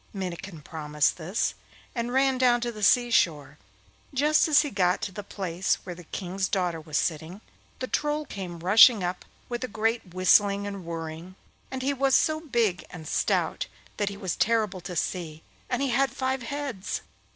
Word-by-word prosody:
Minnikin 180 -3 -6
promised 150 -2 0
this, 180 +6 -1 0.4
and 235 0 -2
ran 265 0 +2
down 245 -2 +4
to 240 0 -1
the 215 -2 -9
sea 240 +3 +4
shore. 155 -10 +1 0.6
Just 300 +4 +4
as 300 -1 +5
he 290 - -4
got 180 -4 +2
to 205 - -2
the 205 - -6
place 190 -3 -1
where 180 - -6
the 175 0 -12
King's 190 +3 -3
daughter 175 -4 -1
was 155 -1 -3
sitting, 165 +3 -2 0.4
the 255 - -3
Troll 295 +3 -1
came 180 - -7
rushing 210 +3 +7
up 180 +1 -3 0.2
with 240 0 -4
a - - -1
great 220 -2 -1
whistling 200 +2 +4
and 200 -3 -6
whirring, 165 +2 -6 0.3
and 260 -1 -4
he 280 +2 +1
was 270 0 +2
so 310 0 +3
big 230 - 0
and 160 -3 -9
stout - - 0 0.3
that 205 -1 0
he 200 - -8
was 190 -5 -3
terrible 215 -4 +1
to 180 0 -7
see, 160 -2 -3 0.3
and 255 +2 0
he 270 - 0
had 270 +2 +3
five 260 +1 -2
heads. 260 -5 -4
200 Hz, 180 wpm, -27 LUFS, 175-245 Hz, 0.6 s, rushing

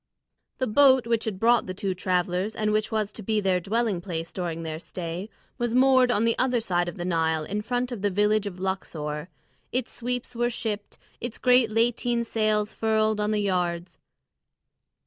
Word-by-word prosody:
The 260 - 0
boat 260 +1 +5
which 230 -1 0
had 205 -4 -3
brought 235 0 +3
the 185 - -5
two 195 -1 -2
travellers, 180 +2 -1
and 215 0 0
which 215 0 0
was 215 -2 -1
to - - -7
be 215 +1 0
their 190 -3 +2
dwelling 210 +1 0 0.3
during 170 -3 -3
their 160 -1 -4
stay, 175 +3 -6 0.3
was 240 -1 0
moored 260 -1 +5
on 230 -2 +2
the 230 - +2
other 255 -1 +2
side 175 -5 0
of - - -9
the 175 - -4
Nile 160 -3 +1
in 205 +6 -3
front 245 +3 -2
of 235 -5 -5
the 205 - +2
village 210 +2 +2
of 185 -2 -7
Luxor. 160 -5 -4 0.4
Its 255 0 -1
sweeps 245 0 -3
were 240 +1 +1
shipped, 215 -3 -4 0.2
its 240 -1 -5
great 250 -2 +4
lateen 235 +1 +1
sails 215 -2 0
furled 220 -1 +1
on 210 0 0
the 215 -1 +1
yards. 180 -3 -1
215 Hz, 185 wpm, -26 LUFS, 185-235 Hz, 0.4 s, boat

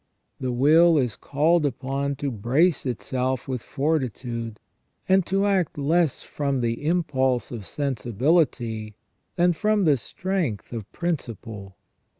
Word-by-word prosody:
The 130 -1 -2
will 155 +7 +5
is 125 -6 +1
called 160 +4 +2
upon 140 +1 -2
to 140 0 -3
brace 130 - +2
itself 125 +1 -2
with 130 -3 -3
fortitude, 125 -7 -2 0.5
and 190 0 +4
to 195 +1 +1
act 190 -7 +1
less 155 +1 +1
from 140 -2 -2
the 120 +5 -2
impulse 130 -7 +1
of 110 -5 -6
sensibility 120 - 0 0.4
than 175 0 +3
from 210 +3 +1
the 145 -3 +4
strength 160 - -3
of 110 -4 -6
principle. 115 - -5
135 Hz, 125 wpm, -25 LUFS, 120-165 Hz, 0.5 s, will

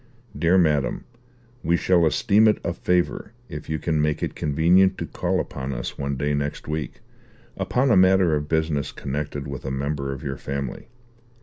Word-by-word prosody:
"DEAR 85 +2 +3
MADAM, 75 -6 +1 0.6
We 85 +1 +2
shall 85 -2 +3
esteem 105 +7 +4
it 105 - +4
a 85 - -1
favour 90 +4 -1 0.2
if 75 +1 -8
you 80 - 0
can 80 0 0
make 75 0 0
it - - -2
convenient 85 +6 +3
to - - -3
call - - -1
upon 65 +1 -4
us - - -5
one 70 -1 -3
day 75 +2 0
next 70 0 -3
week, 75 -2 -4 0.5
upon 130 +1 +1
a - - +6
matter 95 -3 +5
of 75 0 -3
business 80 -4 0
connected 70 0 -4
with 70 -2 -6
a 65 - -3
member 70 +1 -2
of 70 +1 -7
your 70 -2 -4
family. 70 0 -5
75 Hz, 180 wpm, -24 LUFS, 70-90 Hz, 0.6 s, a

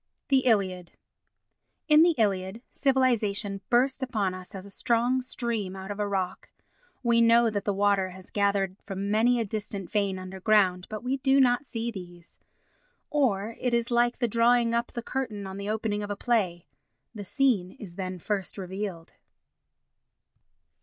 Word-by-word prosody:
The 270 -1 +5
Iliad 185 -6 +1 0.9
In 305 0 +7
the 340 0 +5
Iliad, 200 +1 0
civilisation 225 -7 +1
bursts 260 +2 +2
upon 210 -7 -1
us 185 +2 -9
as 190 0 -7
a 200 - -12
strong 240 +4 +1
stream 235 -6 -3
out 190 +1 -7
of 205 - -6
a 205 - 0
rock. 190 -2 -3 0.5
We 235 -1 +4
know 230 0 +5
that 205 -1 -3
the 205 - +1
water 200 -1 +2
has 185 0 -13
gathered 200 -2 +1
from 200 0 -3
many 235 +3 +3
a 230 - 0
distant 200 -2 -5
vein 200 -3 0
underground, 185 0 +1
but 215 +1 -6
we 260 +2 0
do 270 +1 +3
not 255 +1 +3
see 235 0 -3
these. 175 -4 -11 0.7
Or 230 -7 +1
it 245 -2 +1
is 235 0 -1
like 240 0 +2
the 240 - +1
drawing 235 +1 +3
up 235 0 0
the 235 - -5
curtain 230 -7 -3
on 190 0 -7
the 200 +1 -4
opening 215 -1 -1
of 205 - -5
a 205 - -2
play—the 190 - -3
scene 205 -5 +1
is 190 -5 -10
then 185 -1 -4
first 195 +2 -3
revealed. 190 -3 -5
210 Hz, 160 wpm, -27 LUFS, 190-235 Hz, 0.9 s, In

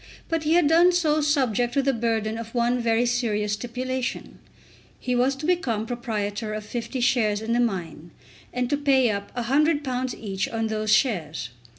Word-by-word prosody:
But 325 -2 -1
he 310 - +3
had 345 -4 +4
done 340 +3 +6
so 310 -3 +2
subject 255 -5 +1
to 275 - +2
the 275 0 +2
burden 225 -2 -1
of 230 +1 -8
one 240 +1 +2
very 230 0 +2
serious 220 -4 0
stipulation. 250 +3 -4 0.6
He 250 - -2
was 255 +2 +2
to 285 +3 -6
become 255 -12 0
proprietor 215 -2 -3
of 215 -1 -6
50 240 +3 -4
shares 225 -4 +2
in 220 +2 -2
the 240 - +2
mine, 175 -8 -2 0.4
and 250 0 -1
to 290 - +2
pay 270 -4 +3
up 200 0 -5
£100 260 0 0
each 195 -3 -3
on 225 -1 -2
those 215 -1 -1
shares. 165 - +1
240 Hz, 175 wpm, -25 LUFS, 215-270 Hz, 0.6 s, done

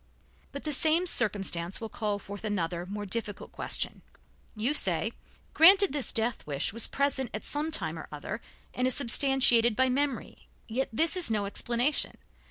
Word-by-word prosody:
But 280 - -7
the 305 - -1
same 320 +5 +3
circumstances 195 - -1
will 225 - -5
call 210 -2 -2
forth 200 0 -9
another, 175 -4 -2
more 205 +1 -5
difficult 205 0 -3
question. - - -3 0.5
You 225 +7 0
say: - - 0 0.4
"Granted 380 +1 +7
this 290 -3 -2
death 225 -4 -2
wish 140 +5 -2
was 230 - +5
present 275 -3 -1
at 215 - -6
some 295 +2 -1
time 320 - -2
or - - -9
other, - - -6 0.3
and 250 0 0
is 255 - 0
substantiated 245 -3 +3
by 260 +2 +2
memory, 275 0 -3 0.2
yet 250 +4 -2
this 320 +11 +1
is 360 -7 +1
no 210 -2 0
explanation. 240 +7 +1
240 Hz, 165 wpm, -29 LUFS, 210-285 Hz, 0.5 s, Granted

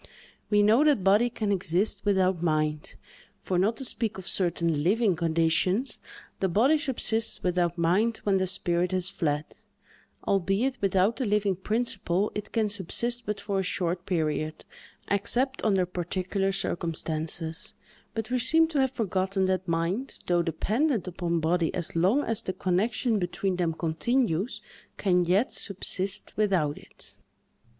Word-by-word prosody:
We 205 -1 +4
know 220 +7 +5
that 290 -10 +3
body 205 +5 +4
can 215 -3 -2
exist 185 +1 +1
without 190 -3 +2
mind; 155 -2 -1 0.4
for, 180 -2 -1
not 215 +5 +1
to 265 - -3
speak 225 -3 -2
of 190 -1 -8
certain 170 -5 0
living 205 +2 +2
conditions, 170 +7 +1 0.4
the 190 - +1
body 260 - +3
subsists 235 -6 -1
without 175 -1 0
mind 195 +7 +2
when 195 -2 +2
the 185 - 0
spirit 180 0 -1
has 185 0 0
fled; 150 -4 -1 0.8
albeit, 200 +7 +1
without 195 +3 +2
the 255 - -1
living 205 -2 +1
principle 200 -2 -1
it 210 0 -6
can 225 -2 +1
subsist 220 +5 -2
but 210 -1 -2
for 200 -1 -2
a - - +2
short 180 -1 -2
period, 155 -3 -2 0.4
except 245 +7 +2
under 195 -4 +2
particular 185 +2 -2
circumstances; 160 -2 -2 0.4
but 225 +1 -4
we 255 - +1
seem 320 +7 +4
to 305 -4 -1
have 265 - +2
forgotten 190 -4 0
that 185 0 -1
mind, 170 +10 -1
though 175 -1 +2
dependent 215 - 0
upon 170 -1 -1
body 165 +1 +1
as 175 -2 -3
long 195 +13 +3
as 225 -1 -1
the 185 - -4
connection 210 +5 0
between 180 +1 -2
them 175 -2 +1
continues, 195 +6 -1 0.4
can 180 -3 +2
yet 190 +8 +2
subsist 195 0 -1
without 185 -9 +1
it. - - -14
190 Hz, 145 wpm, -27 LUFS, 175-220 Hz, 0.8 s, know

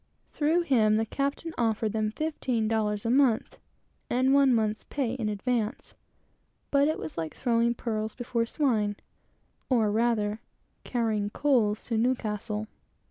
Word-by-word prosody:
Through 320 +4 +2
him, 220 -9 +3
the 220 +1 +1
captain 280 +7 -3
offered 220 -2 +1
them 215 -1 0
fifteen 250 -4 -1
dollars 215 -1 0
a 230 - +1
month, 255 -4 +2 0.5
and 260 +2 +2
one 275 -1 +5
month's 220 -2 +1
pay 260 -5 -2
in 230 -5 -2
advance; 225 +3 -2 0.8
but 280 0 +4
it 310 - 0
was 160 +1 -6
like 160 -1 -4
throwing 235 -1 +1
pearls 220 -2 -3
before 235 -2 -1
swine, 220 -8 +1 0.7
or 225 -5 +3
rather, 215 -1 +1 0.4
carrying 220 -4 -1
coals 220 -4 +1
to 230 -2 -1
Newcastle. 215 -3 -1
230 Hz, 135 wpm, -28 LUFS, 215-260 Hz, 0.8 s, one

